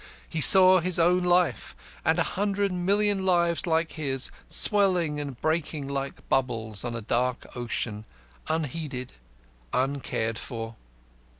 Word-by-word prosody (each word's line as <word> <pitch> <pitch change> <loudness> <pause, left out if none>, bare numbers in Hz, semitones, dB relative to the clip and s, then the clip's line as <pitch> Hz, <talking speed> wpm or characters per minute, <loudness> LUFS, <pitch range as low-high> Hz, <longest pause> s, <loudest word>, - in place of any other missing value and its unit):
He 160 - -4
saw 185 +2 +9
his 180 +1 -1
own 175 +2 +2
life, 175 - 0 0.3
and - - +1
a - - +2
hundred 200 0 -1
million 200 +2 0
lives 175 -1 +1
like 165 0 0
his, 135 -4 -2 0.2
swelling 180 -8 +3
and 140 -4 -7
breaking 155 -2 -2
like 140 -1 -6
bubbles 115 -5 -2
on 120 -1 -5
a 115 - -5
dark 125 +3 -2
ocean, 110 -3 -4 0.4
unheeded, 150 -4 -4 0.6
uncared 130 -4 -2
for. 115 -1 -7
155 Hz, 125 wpm, -25 LUFS, 125-180 Hz, 0.6 s, saw